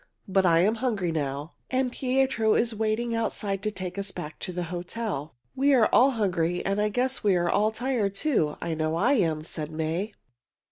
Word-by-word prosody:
"But 190 -1 +3
I 165 -1 +5
am 205 +5 +3
hungry 205 -9 0
now, 145 0 -3 0.2
and 260 -1 0
Pietro 255 -4 +1
is 230 0 +2
waiting 220 +2 -1
outside 205 -3 -1
to 215 - -1
take 185 -2 -5
us 200 0 -1
back 155 -4 -7
to 185 - -3
the 180 0 -3
hotel." 175 - -4 0.2
"We 275 +1 +4
are 230 -4 +4
all 260 +3 +6
hungry, 180 -4 0
and 195 +1 +1
I 210 - +2
guess 255 +4 -1
we 200 -3 +4
are 175 -1 +1
all 210 +1 +3
tired, 220 -3 -1
too. 200 - +1
I 165 - -2
know 155 0 -1
I 235 +11 +3
am," 165 - +1
said 155 -1 -5
May. 160 +6 -2
200 Hz, 195 wpm, -27 LUFS, 170-230 Hz, 0.2 s, all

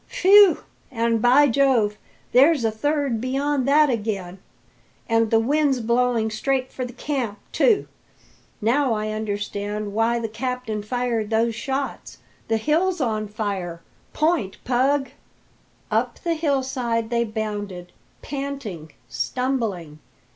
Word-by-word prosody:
"Phew! 400 0 +6 0.3
And, 230 -3 0
by 260 +5 +6
Jove, 235 -5 +2 0.3
there's 275 0 +5
a 220 - +2
third 275 0 -1
beyond 270 +1 -1
that 300 +2 +5
again! 205 -7 -3 0.7
And 225 -1 +2
the 225 - +4
wind's 280 +2 +2
blowing 235 -1 +1
straight 260 +4 -1
for 255 - -4
the 250 - -5
camp, 250 -5 -3
too! 435 -5 +3 0.7
Now 250 +3 +2
I 215 0 -2
understand 205 -1 -4
why 225 +2 +2
the 230 -1 -2
captain 230 -1 -4
fired 230 -1 -2
those 225 +1 +1
shots! 270 +4 -4 0.3
The 225 - +1
hill's 330 +9 +1
on 215 -5 -1
fire! 195 -5 -4 0.3
Point, 305 - 0
Pug!" 265 +2 +1 0.8
Up - - 0
the 340 - +1
hillside 260 -7 -1
they 235 0 +2
bounded, 205 -5 -5 0.3
panting, 270 - -6
stumbling. 225 - -2
235 Hz, 120 wpm, -23 LUFS, 215-275 Hz, 0.8 s, Phew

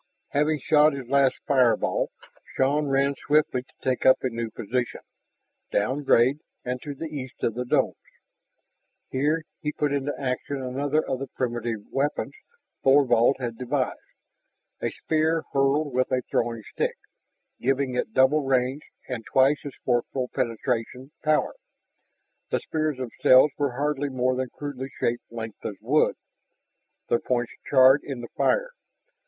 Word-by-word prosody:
Having 150 0 +1
shot 150 -1 +5
his 135 -3 -6
last 135 -1 +3
fireball, 130 -5 +2 0.5
Shann 145 +3 +2
ran 135 +1 +2
swiftly 150 -4 +3
to 130 - -26
take 130 -1 0
up 130 - +7
a 130 - +1
new 115 0 -3
position, 120 +3 -3 0.7
downgrade 130 +3 +2 0.3
and 125 0 -3
to 145 -2 -6
the 160 - -6
east 140 -5 -7
of 115 - +1
the 125 +2 -3
domes. - - +1 1.1
Here 150 +5 +1 0.2
he 150 - -2
put 145 -1 -1
into 140 0 -1
action 135 +1 -2
another 140 +4 -1
of 130 - -2
the 135 - -4
primitive 120 -3 -3
weapons 140 +2 -1 0.5
Thorvald 135 -2 +5
had 120 -3 -5
devised, 130 +1 -1 0.8
a - - 0
spear 160 +1 0
hurled 140 +1 +2
with 130 0 +1
a 125 -1 +1
throwing 115 -1 0
stick, - - -1 0.6
giving 135 0 0
it 125 - -2
double 130 +4 +4
range 130 +1 +1 0.3
and 125 -4 -4
twice 135 +2 +4
as 140 - -6
forceful 125 +1 0
penetration 125 +1 -2
power. 155 0 +2 1.0
The - - +1
spears 155 -3 -2
themselves 130 +2 +4
were 140 -3 -1
hardly 145 0 0
more 130 -1 0
than 130 0 -2
crudely 135 -2 -6
shaped 120 +1 -1
lengths 115 -2 -7
of - - -4
wood, - - +2 0.9
their 120 - +2
points 120 -2 -1 0.2
charred 135 +1 +7
in 135 -4 -5
the 120 - -8
fire. - - +1
130 Hz, 145 wpm, -25 LUFS, 125-145 Hz, 1.1 s, up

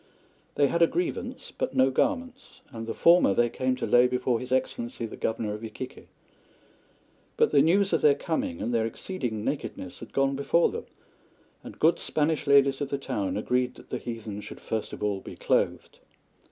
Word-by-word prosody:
They 145 - +4
had 170 +5 0
a 170 - +7
grievance, 295 - -3
but 135 - -3
no 130 +1 +4
garments, 260 - -2
and 115 -2 -7
the 115 - -2
former 170 - +5
they 120 -1 +2
came 130 +1 0
to - - -3
lay 125 +1 +5
before 125 -1 0
His 125 0 -8
Excellency, 120 -2 -1
the 110 - -7
Governor 110 -1 -2
of 105 +2 -7
Iquique. 110 -1 -8 1.3
But - - +3
the 145 - +5
news 190 +5 +3
of 165 - +2
their 145 -2 +5
coming 140 - -3
and 120 - -2
their 115 -1 +2
exceeding 115 - -4
nakedness 110 -9 -4
had - - -10
gone 135 0 +1
before 140 +5 +2
them, - - -6 0.8
and - - -10
good 160 +2 +3
Spanish 155 0 0
ladies 140 -1 +4
of 140 - -2
the 140 - -1
town 105 -9 -2
agreed 125 +3 0
that - - -16
the - - -2
heathen 110 -3 -6
should - - -10
first 110 -1 -3
of - - -7
all 100 -2 0
be - - -9
clothed. - - -1
130 Hz, 190 wpm, -27 LUFS, 115-150 Hz, 1.3 s, a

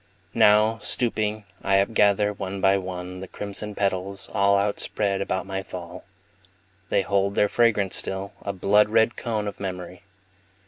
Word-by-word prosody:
Now, 110 +2 +4
stooping, 110 -2 -1 0.2
I 95 - +2
upgather, 105 0 +2
one 95 0 -5
by 95 +1 +4
one, 90 -1 -6
The 95 - -7
crimson 105 +1 -5
petals, 100 0 -2
all 100 0 +3
Outspread 100 0 0
about 95 -1 -2
my 95 0 -3
fall. 90 -2 -9 0.8
They 100 - +2
hold 100 +1 0
their 105 - +4
fragrance 105 -4 +2
still, 95 +1 -3
a 100 - -3
blood 105 +2 +3
red 110 +1 +3
cone 110 -3 -3
Of 100 - -6
memory. 90 -1 -6
100 Hz, 145 wpm, -24 LUFS, 95-105 Hz, 0.8 s, Now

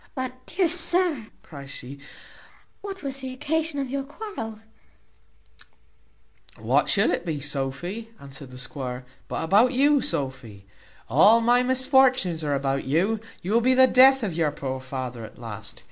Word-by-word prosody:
"But, 255 -1 -6
dear 360 +1 +1
sir," 335 -6 +1 0.2
cries 140 -3 -11
she, 135 +2 -8 0.8
"what 390 -2 -8
was 275 -1 -3
the 265 -1 -6
occasion 305 +2 -1
of 270 -2 -3
your 275 0 -1
quarrel?" 275 - -7 2.0
"What - - +1
should - - +3
it - - -2
be, 160 -4 -3
Sophy," 150 +10 -4
answered 140 -1 -10
the 125 - -11
squire, 125 -1 -5 0.2
"but - - -3
about 210 +10 +4
you, 285 +2 +3
Sophy? 130 - -3 0.4
All 195 - +6
my 240 +2 +3
misfortunes 255 -8 +3
are 145 -1 0
about 135 0 -1
you; 185 +11 +1 0.2
you 190 +4 -2
will 235 - +4
be 255 +2 +3
the 260 0 +7
death 265 0 +6
of 195 -6 -2
your 160 -2 +1
poor 130 -2 -5
father 130 -3 -6
at 110 - -11
last. 110 -3 -8
215 Hz, 155 wpm, -25 LUFS, -, 2.0 s, the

